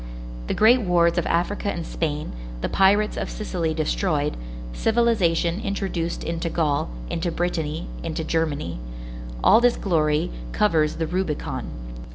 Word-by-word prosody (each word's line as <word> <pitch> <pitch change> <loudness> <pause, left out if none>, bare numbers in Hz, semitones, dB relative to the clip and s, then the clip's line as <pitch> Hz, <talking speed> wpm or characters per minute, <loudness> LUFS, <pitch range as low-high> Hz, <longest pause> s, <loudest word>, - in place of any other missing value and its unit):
The - - -1
great 240 +4 +6
wars 175 -3 +3
of 170 - -2
Africa 200 +4 0
and 170 -1 -4
Spain, 150 -3 -2 0.3
the - - 0
pirates 205 +2 +3
of - - -2
Sicily 170 -7 -2
destroyed, 155 -1 0 0.4
civilization 200 - +2
introduced 190 -4 -2
into 170 0 -2
Gaul, 150 - 0 0.2
into 170 +1 -1
Britanny, 165 -2 -2 0.2
into 160 -1 -3
Germany,—all - - 0
this 245 0 +4
glory 155 - +1 0.2
covers 160 -7 +2
the 165 - -1
Rubicon. 175 -2 -2
165 Hz, 125 wpm, -24 LUFS, 155-190 Hz, 0.4 s, great